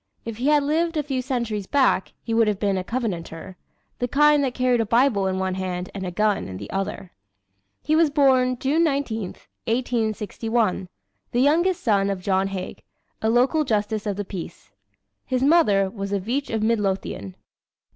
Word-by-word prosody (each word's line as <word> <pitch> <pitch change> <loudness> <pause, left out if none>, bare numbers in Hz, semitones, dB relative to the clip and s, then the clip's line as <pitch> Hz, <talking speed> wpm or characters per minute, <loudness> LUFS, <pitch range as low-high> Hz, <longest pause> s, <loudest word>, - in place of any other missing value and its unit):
If 225 -2 -5
he 250 +4 -1
had 295 -1 +4
lived 325 +3 0
a 300 - +1
few 265 -3 -2
centuries 235 -6 -3
back 265 -9 +2
he 230 - -3
would 225 -1 +4
have 210 -2 +1
been 200 -2 +1
a 185 - -2
Covenanter 185 -6 -4 0.4
the 245 - 0
kind 295 +2 +4
that 255 -2 -2
carried 250 -2 +2
a - - 0
Bible 230 -4 +3
in 190 0 -1
one 190 0 -1
hand 185 -1 -4
and 190 -2 -4
a - - -4
gun 210 +2 0
in 95 -1 -7
the - - -8
other. 195 -1 -4 0.7
He 310 - +2
was 325 -1 +4
born, 260 -3 +3
June 290 +6 +1
19, 275 -7 0 0.4
1861, 225 -4 -1 0.4
the 240 - +2
youngest 340 +6 +2
son 200 -3 +2
of 195 -2 -2
John 190 0 +1
Haig, 190 -2 -6 0.4
a 220 - +1
local 255 +7 +3
Justice 215 -3 -1
of 205 - -1
the 205 +1 -4
Peace. 170 - -8 0.5
His 255 0 -1
mother 270 - +4
was 200 -1 -6
a 200 - +1
Veitch 250 +9 -2
of 220 -1 -1
Midlothian. 195 - -1
225 Hz, 180 wpm, -23 LUFS, 195-265 Hz, 0.7 s, had